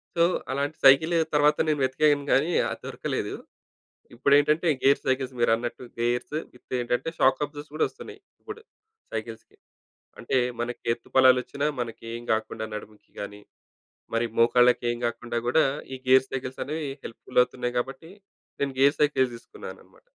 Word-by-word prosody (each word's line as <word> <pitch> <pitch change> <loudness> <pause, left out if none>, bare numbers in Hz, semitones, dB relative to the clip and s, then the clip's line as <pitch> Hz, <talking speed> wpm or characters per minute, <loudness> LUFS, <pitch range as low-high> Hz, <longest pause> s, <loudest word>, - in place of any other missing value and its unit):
So 170 - +4 0.3
అలాంటి 140 +3 -2
cycle 160 +6 +6 0.2
తరువాత 150 0 +4
నేను 150 -2 +1
వెతికాను 145 +2 +2
గాని 155 +6 +3 0.2
అది - - -6
దొరకలేదు. - - -3 0.8
ఇప్పుడేంటంటే 145 +6 +3 0.2
గేర్ 140 +1 +5
సైకిల్స్ 130 0 0
మీరన్నట్టు 120 +1 0 0.2
గేర్స్ 120 +4 -1 0.2
విత్ 125 - -7
ఏంటంటే 125 +6 -1
షాక్ 130 +1 +3
అబ్జార్బస్ 145 0 -11
కూడా 155 - +2
వస్తున్నాయి. 430 -1 -11 0.2
ఇప్పుడు 435 0 -9 0.5
సైకిల్స్‌కి. 110 0 -7 0.6
అంటే 125 +3 -2 0.2
మనకి 120 +1 -4
ఎత్తు 120 - -8
పల్లాలు 130 -1 +7
వచ్చిన 140 +4 -4 0.2
మనకేం 115 0 -6
గాకుండా 110 0 -2
నడుముకి 105 0 -10
గాని, 100 0 -7 0.8
మరి 115 - +2
మోకాళ్ళకేం 120 0 +4
గాకుండా 120 0 -3
గూడా 155 +6 +4 0.3
ఈ - - -4
గేర్ 130 0 +6
సైకిల్సనేవి 135 +3 -4 0.2
హెల్ప్‌ఫుల్ 125 +2 -2
అవుతున్నాయి 125 -1 -5
కాబట్టి 135 +6 -6 0.5
నేను 140 -1 -1
గేర్ 140 +2 +5
సైకిలే 145 -3 +3
తీసుకున్నానన్నమాట. 120 - -12
130 Hz, 135 wpm, -26 LUFS, 120-145 Hz, 0.8 s, పల్లాలు